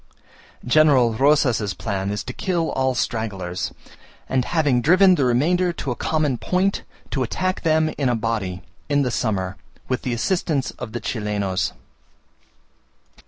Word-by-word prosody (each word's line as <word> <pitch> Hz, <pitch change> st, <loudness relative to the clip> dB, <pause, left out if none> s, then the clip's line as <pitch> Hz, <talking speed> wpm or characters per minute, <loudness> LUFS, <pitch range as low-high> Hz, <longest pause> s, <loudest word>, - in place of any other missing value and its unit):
General 130 Hz, -3 st, +4 dB
Rosas's 125 Hz, -6 st, +2 dB
plan 95 Hz, 0 st, -3 dB
is 105 Hz, 0 st, -3 dB
to -, -, -6 dB
kill 175 Hz, -4 st, -1 dB
all 130 Hz, -1 st, 0 dB
stragglers, 100 Hz, -7 st, -2 dB, 0.6 s
and 130 Hz, -2 st, 0 dB
having 145 Hz, -7 st, +2 dB
driven 185 Hz, +6 st, +6 dB
the 150 Hz, -6 st, +1 dB
remainder 170 Hz, +9 st, +2 dB
to 140 Hz, -5 st, -4 dB
a -, -, -2 dB
common 150 Hz, -5 st, 0 dB
point, 190 Hz, +2 st, 0 dB, 0.3 s
to 135 Hz, -, -1 dB
attack 185 Hz, +10 st, -1 dB
them 155 Hz, -1 st, +2 dB
in 135 Hz, -3 st, +2 dB
a 120 Hz, -, +2 dB
body, 105 Hz, -5 st, -2 dB, 0.3 s
in 145 Hz, -1 st, +3 dB
the 125 Hz, -, -1 dB
summer, 95 Hz, -5 st, -1 dB, 0.3 s
with 130 Hz, -1 st, -1 dB
the 125 Hz, -, -3 dB
assistance 145 Hz, +2 st, 0 dB
of 110 Hz, -, -6 dB
the 120 Hz, -, -2 dB
Chilenos. 105 Hz, -4 st, -2 dB
130 Hz, 145 wpm, -22 LUFS, 110-155 Hz, 0.6 s, driven